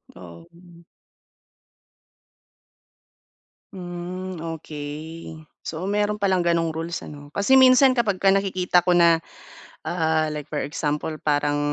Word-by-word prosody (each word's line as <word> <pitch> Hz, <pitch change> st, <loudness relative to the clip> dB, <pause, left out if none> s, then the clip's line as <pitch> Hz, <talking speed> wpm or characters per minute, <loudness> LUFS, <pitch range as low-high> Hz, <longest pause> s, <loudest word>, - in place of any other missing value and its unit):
Oo. 170 Hz, -, -15 dB, 2.9 s
Hmm, 180 Hz, 0 st, -6 dB, 0.2 s
okey. 155 Hz, +2 st, -8 dB, 0.2 s
So, 170 Hz, +4 st, -5 dB
mayro'n 210 Hz, +1 st, 0 dB
palang 190 Hz, -3 st, +1 dB
ganong 165 Hz, -2 st, 0 dB
rules 165 Hz, +1 st, -4 dB
ano? 145 Hz, 0 st, -11 dB
Kasi 200 Hz, +9 st, +3 dB
minsan 260 Hz, 0 st, +6 dB
kapagka 205 Hz, -5 st, +1 dB
nakikita 185 Hz, -2 st, +2 dB
ko 180 Hz, -, +1 dB
na, 170 Hz, -2 st, +4 dB, 0.6 s
ah, 160 Hz, -2 st, 0 dB
like 150 Hz, -1 st, -5 dB
for 150 Hz, 0 st, -4 dB
example 150 Hz, +2 st, -2 dB
parang 145 Hz, -1 st, 0 dB
170 Hz, 100 wpm, -23 LUFS, 155-185 Hz, 2.9 s, minsan